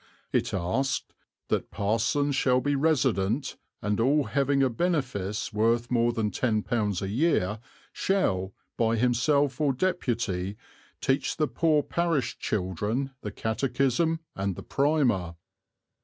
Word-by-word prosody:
It - - +1
asked 95 +10 -1 0.4
"that - - 0
parsons 115 +7 0
shall 130 -1 +3
be 145 +2 0
resident, 135 -5 +1 0.3
and 105 +1 0
all 140 +6 +3
having 140 +2 +1
a 130 - +3
benefice 115 - -1
worth 115 +3 +1
more 120 -1 +3
than 110 -3 -1
£10 110 -4 0
a - - -2
year 110 - +1 0.3
shall, 95 - 0 0.3
by 115 0 +2
himself 125 +4 +2
or 145 -3 +3
deputy, 120 - -1 0.4
teach 135 +1 0
the 155 - +2
poor 150 +4 +2
parish 165 -8 -1
children 105 +7 -2
the 105 - -4
catechism 135 - 0
and 95 -1 -2
the - - -8
primer." 130 - +1
125 Hz, 125 wpm, -27 LUFS, 105-140 Hz, 0.4 s, shall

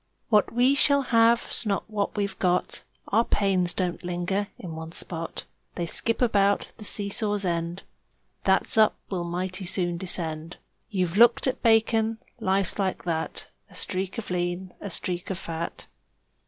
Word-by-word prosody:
What 210 -3 +4
we 245 +3 +4
shall 280 0 +4
have's 230 +1 +3
not 200 -3 -1
what 210 -1 -2
we've 200 -2 -2
got; 180 -1 0 0.3
Our 225 +3 +4
pains 190 -5 +1
don't 180 -1 -2
linger 180 +3 -1
in 170 -4 -7
one 160 +1 -7
spot 165 -2 -4 0.3
They 175 - -2
skip 230 +8 +2
about; 200 -3 +2
the 215 - -10
seesaw's 205 0 0
end 170 +1 -2 0.6
That's 190 +3 +2
up 215 - +5 0.2
will 180 -3 -1
mighty 185 +2 -3
soon 175 -2 +1
descend; 165 -3 -1 0.3
You've 185 -2 -1
looked 235 +1 +6
at 260 - -1
bacon? 225 -1 +3 0.2
Life's 195 -2 0
like 190 -2 -1
that 160 -2 -3 0.2
A - - -17
streak 190 +3 -3
of 220 -5 -5
lean, 175 +1 -2
a 200 - -5
streak 180 +1 +1
of 190 - -2
fat. 170 -2 -5
190 Hz, 155 wpm, -26 LUFS, 175-215 Hz, 0.6 s, looked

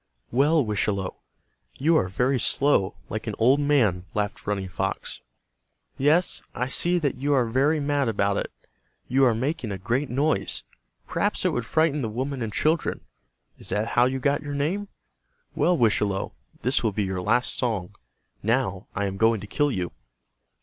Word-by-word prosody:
"Well, 145 +3 +3
Wischalowe, 100 -2 -1 0.6
you 160 +5 +3
are 95 - +3
very 125 +8 +1
slow, 115 -6 +2
like 110 +1 -5
an 110 - -2
old 130 +5 +4
man," 115 -12 +2
laughed 105 -1 -2
Running 100 -2 -1
Fox. 90 - -3 0.7
"Yes, 155 +6 +2
I 125 - 0
see 175 +7 +1
that 145 -6 -1
you 145 +3 +1
are 125 -3 +3
very 135 +7 +2
mad 145 -3 +1
about 100 -2 +1
it. - - -3 0.6
You 135 +2 +4
are 120 -3 +3
making 130 -1 -2
a 100 - -3
great 120 +9 -1
noise. 145 +5 0 0.4
Perhaps - - 0
it - - +5
would 120 -1 -2
frighten 155 +1 +2
the 115 - -2
women 130 +4 -3
and 110 -2 -2
children. 155 +8 0 0.6
Is - - -5
that 110 +2 0
how 120 - +4
you 130 +1 0
got 140 +2 +1
your 145 0 -5
name? 175 +9 -1 0.7
Well, 175 -1 +2
Wischalowe, 105 -4 +1 0.3
this 125 +3 +3
will 110 - +2
be 105 +1 -1
your 95 -1 -3
last 125 +7 +1
song. 105 -7 -1 0.5
Now 110 -4 0
I 100 - 0
am 95 0 -3
going 115 +1 +3
to - - -7
kill 145 +7 +1
you." 90 -6 -2
125 Hz, 170 wpm, -25 LUFS, 105-145 Hz, 0.7 s, it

